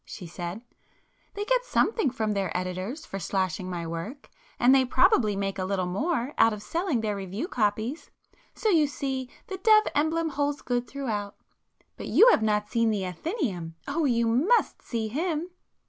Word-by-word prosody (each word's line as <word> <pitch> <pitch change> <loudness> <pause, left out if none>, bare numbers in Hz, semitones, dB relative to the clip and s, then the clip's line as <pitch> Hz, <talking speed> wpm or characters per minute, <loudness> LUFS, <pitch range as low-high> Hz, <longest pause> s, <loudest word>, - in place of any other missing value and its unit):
she 180 - -9
said—"They 195 - -9
get - - +2
something 445 - +1
from 220 -3 -2
their 195 -3 -1
editors 185 - -4
for 195 - -6
'slashing' 185 0 -2
my 175 -2 -4
work,—and 245 - -1
they 270 -1 +6
probably 245 -4 +3
make 195 0 -2
a - - 0
little 190 -1 -1
more 270 - -1
out 225 - +6
of 210 -1 -7
selling 330 - -1
their 210 -2 -1
'review 200 - -4
copies.' 220 - -1 0.5
So 440 - 0
you 320 -6 +4
see 265 -2 -3 0.2
the 385 -5 -6
dove 430 +2 +6
emblem 320 +2 +1
holds 285 0 -2
good 245 -1 -1
throughout. 215 -7 -4 0.6
But - - -6
you 485 - +7
have - - +3
not 210 -1 +1
seen 230 +1 +1
the 205 -3 0
'Athenæum,'—oh, 185 - -3
you 235 -3 +2
must 295 - +2
see 225 -2 -3
him!" 325 +7 -2
235 Hz, 160 wpm, -27 LUFS, 195-305 Hz, 0.6 s, you